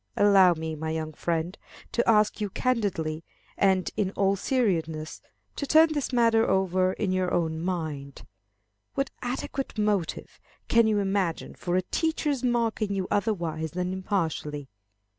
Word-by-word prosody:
Allow 195 -3 +6
me, 160 0 -4
my 160 +1 -4
young 160 -1 -3
friend, 170 +3 -2 0.4
to 235 - +1
ask 215 -1 +3
you 205 - -1
candidly 185 -10 -1 0.3
and 190 -2 +2
in 205 -3 0
all 195 0 +2
seriousness 165 -10 -1 0.4
to 285 - -3
turn 315 +1 +6
this 290 -3 -2
matter 230 -2 +3
over 185 -1 +2
in 190 -1 -1
your 185 -1 0
own 160 -2 0
mind. 155 -6 -4 0.7
What 275 0 -1
adequate 255 +1 -4
motive 205 -5 -1 0.3
can 230 -1 +4
you 215 -1 +2
imagine 195 -4 -1
for 175 0 -3
a 185 - +2
teacher's 300 - -1
marking 230 -4 0
you 190 -1 -2
otherwise 170 -7 -1
than 180 +1 -2
impartially? 160 -7 -2
190 Hz, 140 wpm, -27 LUFS, 165-225 Hz, 0.7 s, Allow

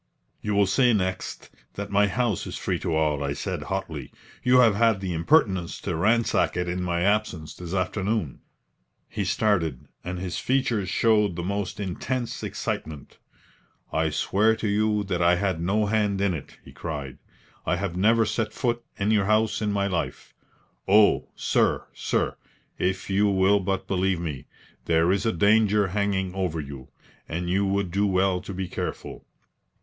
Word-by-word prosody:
"You 105 -1 -1
will 100 0 +4
say 120 +6 +3
next 95 -3 -3 0.2
that - - -5
my 100 0 +4
house 110 0 -1
is - - -5
free - - -2
to 80 - -1
all," 75 -2 +1
I 70 0 -1
said, 70 - -4
hotly. - - -4 0.3
"You 125 0 +4
have 115 -4 +5
had 110 -1 +3
the 95 -2 -3
impertience 95 - +2
to 90 - -2
ransack 110 +4 +2
it 90 0 -1
in 90 +1 -2
my 85 -1 -1
absence 100 -5 0
this 90 +1 -6
afternoon." 95 - -1 0.7
He 105 - -3
started, 90 - 0 0.2
and 90 +1 -4
his 90 0 -4
features 120 -7 0
showed 105 -3 +2
the 85 - -4
most 100 +1 -3
intense 115 +6 -3
excitement. 75 -3 -5 0.7
"I 80 0 +1
swear 105 +8 +2
to 110 -1 -3
you 105 0 +1
that 95 -3 -2
I 85 +1 +5
had 90 -2 -1
no 105 +5 +1
hand 105 -2 +1
in 100 -2 +1
it!" 75 - -8
he - - -12
cried. 70 -6 -6 0.5
"I - - +2
have 90 -1 -3
never 110 +4 +4
set 110 +1 -2
foot 120 -2 -1
in 100 +2 +1
your 105 -3 +3
house 110 +2 +2
in 105 -1 0
my 100 -1 0
life. 90 -5 -3 0.5
Oh, 105 +2 +5
sir, - - +1
sir, - - -1 0.4
if 95 +1 -1
you 100 +2 +3
will 100 +1 +4
but 95 0 -2
believe 95 -1 +1
me, 75 -6 -5 0.4
there 85 +1 +3
is 100 +4 +1
a - - +3
danger 105 +2 +3
hanging 95 -1 -1
over 90 -4 -2
you, 70 -3 -8 0.4
and 85 +2 -2
you 100 +2 +2
would 100 -2 0
do 100 +3 +1
well 95 -1 +1
to - - -8
be 95 0 -3
careful." - - -6
95 Hz, 170 wpm, -25 LUFS, 90-105 Hz, 0.7 s, have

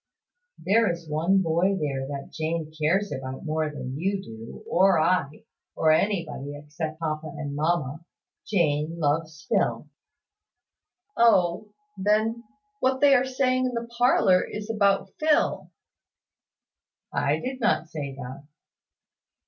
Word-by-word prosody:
"There 220 0 +3
is 170 -1 -7
one 170 +6 +2
boy 175 +4 +1
there 135 -3 -2
that 140 -1 -6
Jane 160 0 -3
cares 175 +6 +1
about 130 +2 -6
more 155 0 0
than 135 -2 -6
you 195 +3 0
do, 115 -9 -10
or 185 -1 +4
I, 155 -3 0 0.3
or 155 - +3
anybody, 155 -6 0
except 155 +2 -6
papa 155 -1 -3
and 145 -1 -5
mamma. 155 -1 -1 0.4
Jane 165 -4 0
loves 155 0 -1
Phil." - - 0 1.3
"O, 205 -3 +3 0.3
then, 215 +4 +1 0.3
what 260 0 +1
they 285 0 +6
are 255 -1 +4
saying 255 -1 +1
in 250 - -4
the 235 0 -3
parlour 235 -6 +4
is 210 +1 -5
about 200 -2 +2
Phil." 310 -1 +1 1.4
"I - - +1
did 260 +1 -5
not 225 -9 +1
say 140 -4 -5
that." 135 +2 -9
170 Hz, 125 wpm, -26 LUFS, 150-205 Hz, 1.4 s, they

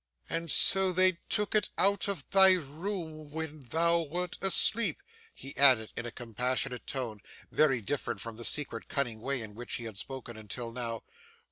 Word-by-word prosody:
And 165 0 -3
so 190 +3 +6
they 185 -1 +3
took 210 -1 -1
it 215 -2 +2
out 200 0 +2
of 200 -3 -4
thy 190 -1 +8
room, 160 -1 -5
when 155 0 -6
thou 165 +6 +1
wert 175 +3 -4
asleep!' 220 +4 +3 0.3
he 140 - -8
added 130 -6 +5
in 120 - -4
a - - -6
compassionate 125 +2 -2
tone, 120 -6 -4 0.3
very 135 -6 +3
different 140 +7 -3
from 115 -1 -6
the 120 - -8
secret, 115 -4 -2
cunning 120 -6 -2
way 135 -1 -1
in 105 -1 -10
which 120 +3 -4
he 120 - -5
had 110 -4 -6
spoken 125 -3 -7
until 115 +2 -6
now. 115 -2 -4
140 Hz, 170 wpm, -30 LUFS, 120-175 Hz, 0.3 s, thy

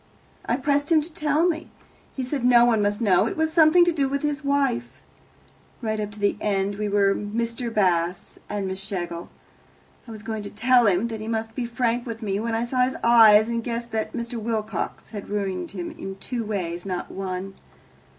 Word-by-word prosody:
I 240 - +1
pressed 285 +3 0
him 320 - +6
to 315 +2 -9
tell 310 0 +2
me. 320 -2 -2 0.5
He 265 - -2
said 255 0 -3
no 240 -1 +6
one 225 -3 +3
must 205 +2 0
know; 200 -1 +4
it - - -4
was 320 0 0
something 330 +1 +6
to 345 - +3
do 280 -5 0
with 280 +1 -2
his 295 0 -1
wife. 275 - 0 0.9
Right 220 -2 -2
up 210 -1 -2
to 210 - -12
the 205 0 +1
end 200 0 -1
we 210 -1 -1
were 200 -1 +3
Mr. 230 +3 -3
Bast 180 -4 0
and 205 -2 -2
Miss 190 0 -4
Schlegel. 175 -3 -5 0.8
I - - -9
was 215 -1 -9
going 220 -1 -4
to 205 - -7
tell 245 +2 +4
him 195 +3 +2
that 220 -1 -5
he 215 - -6
must 225 0 -2
be 240 0 -3
frank 240 0 -1
with 225 0 -6
me 200 -1 -1
when 230 +1 -1
I 230 +1 0
saw 250 +1 0
his 255 +1 -1
eyes, 220 -2 +7
and 230 0 -2
guessed 235 0 -4
that 220 -1 -2
Mr. 235 -1 -4
Wilcox 220 -3 -3
had 205 -3 -7
ruined 190 -4 -2
him 180 -3 -6
in 195 0 -7
two 235 +4 -4
ways, 180 -5 -3
not 185 -2 -4
one. 190 0 -4
225 Hz, 210 wpm, -24 LUFS, 200-250 Hz, 0.9 s, eyes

